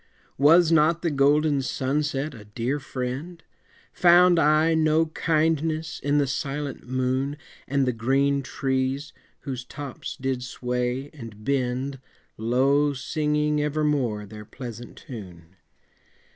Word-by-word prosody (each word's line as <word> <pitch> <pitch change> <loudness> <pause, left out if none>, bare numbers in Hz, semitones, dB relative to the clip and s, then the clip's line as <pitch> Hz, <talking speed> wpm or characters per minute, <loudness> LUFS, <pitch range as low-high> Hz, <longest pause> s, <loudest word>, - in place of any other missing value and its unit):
Was 165 +4 +6
not 165 +2 +3
the 170 - +1
golden 145 +1 +3
sunset 140 +3 -1
a 110 -4 -11
dear 115 +7 -2
friend? 135 +6 -5 0.5
Found 175 0 +6
I 155 +2 +4
no 160 0 +3
kindness 160 0 0
in 145 +1 +1
the 145 - +3
silent 140 0 -4
moon, 130 +3 -1 0.3
And 140 0 +1
the 125 - 0
green 135 +4 +1
trees, 135 +2 -2 0.3
whose 130 -3 -5
tops 140 +1 -7
did 130 -1 -2
sway 125 +2 -3
and 115 -7 -10
bend, 135 0 -1 0.4
Low 135 +6 +2
singing 150 +2 0
evermore 145 -8 0
their 105 +1 -10
pleasant 120 +1 -9
tune? 90 -7 -11
140 Hz, 115 wpm, -25 LUFS, 125-150 Hz, 0.5 s, Was